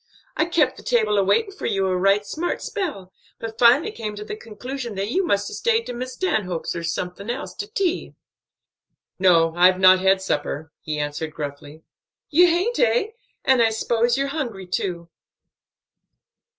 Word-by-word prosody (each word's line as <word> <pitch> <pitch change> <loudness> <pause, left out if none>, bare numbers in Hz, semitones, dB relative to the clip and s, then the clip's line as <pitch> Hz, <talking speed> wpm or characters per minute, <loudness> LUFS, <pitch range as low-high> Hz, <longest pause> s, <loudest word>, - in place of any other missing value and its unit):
I 315 - +2
kep' 335 -3 +1
the - - -10
table 215 -4 +2
a - - +3
waitin' 395 - +2
for 395 - -5
you 195 -1 0
a 185 -1 0
right 195 +3 +2
smart 335 +10 -3
spell, 235 - -4 0.2
but 225 -1 -7
finally 250 - +5
come 215 - -5
to 210 +1 -7
the 210 - -5
conclusion 235 +2 -7
that 200 +3 -3
you 380 +7 +1
must 200 - 0
'a' - - -7
stayed 460 -1 +1
to 245 - -5
Miss 255 +1 -5
Stanhope's 185 - -2
or 170 - -3
someone 180 +5 -4
else, 260 +4 -4
to 410 - -4
tea." 395 -5 -2 1.0
"No, 165 -3 +4
I've 180 +1 +5
not 185 0 +7
had 190 +1 +3
supper," 155 -3 -3
he 155 -1 -4
answered 150 +1 -4
gruffly. 145 +1 -7 0.5
"You 350 +4 +6
haint, 365 +8 0
eh? 235 - +2 0.3
and 260 -2 +4
I 225 - +5
'spose 235 +2 +1
you're 275 0 0
hungry, 240 -11 -4
too. 175 -1 -3
215 Hz, 175 wpm, -23 LUFS, 185-275 Hz, 1.0 s, not